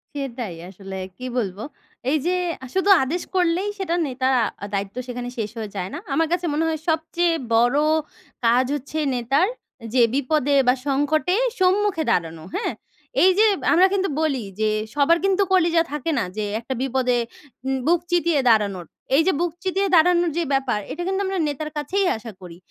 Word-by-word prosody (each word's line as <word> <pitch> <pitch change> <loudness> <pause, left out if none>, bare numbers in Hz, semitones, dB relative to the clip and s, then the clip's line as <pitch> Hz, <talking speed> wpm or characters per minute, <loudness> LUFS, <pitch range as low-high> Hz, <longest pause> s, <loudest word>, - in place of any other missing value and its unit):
সেটাই 245 -9 -4
আসলে। 195 0 -9 0.2
কি 255 - -7
বলবো? 205 -3 -2 0.5
এই 305 - +3
যে, 355 - +2 0.3
আ - - -5
শুধু 380 +1 +2
আদেশ 325 +7 -2
করলেই 360 +2 +2
সেটা 350 -3 -1
নেতা, 260 0 -1 0.5
দায়িত্ব 200 0 -3
সেখানে 245 0 -5
শেষ 215 -2 -2
হয়ে 220 -2 -4
যায় 185 -1 -3
না। - - -4 0.2
আমার 325 0 +2
কাছে 355 0 0
মনে 305 +2 +1
হয় 320 -1 -1
সবচেয়ে 330 +2 +1 0.2
বড় 240 +4 +3 0.7
কাজ 240 +3 +4
হচ্ছে 290 +3 -5 0.2
নেতার, 270 +9 +2 0.5
যে 255 - +4
বিপদে 285 +1 +1
বা 250 - +6
সংকটে 290 +5 +1 0.2
সম্মুখে 375 -2 +2
দাঁড়ানো। 165 -2 -1
হ্যাঁ? 440 - -1 0.5
এই 375 - +7
যে 440 - +7 0.3
আমরা 365 +3 +6
কিন্তু 390 -1 +1
বলি 285 -5 0 0.2
যে, 215 0 +2 0.3
সবার 295 +4 +4
কিন্তু 390 0 +2
কলিজা 340 -2 +4
থাকে 295 +2 -2
না। - - 0
যে 215 - -1 0.2
একটা 240 +3 -5
বিপদে 260 -2 +1 0.5
উম 265 0 0
বুক 345 +1 +4
চিতিয়ে 340 -3 +2
দাঁড়ানোর। 200 -5 +2 0.3
এই 295 - +6
যে - - +5
বুক 350 0 0
চিতিয়ে 385 +1 0
দাঁড়ানোর 345 +1 +4
যে 345 - +1
ব্যাপার, 265 -5 +1
এটা 345 - -5
কিন্তু 385 +1 0
আমরা 385 0 -2
নেতার 295 +1 -4
কাছেই 375 +7 0
আশা 225 +1 -9
করি। 175 -2 -10
290 Hz, 175 wpm, -22 LUFS, 245-350 Hz, 0.7 s, এই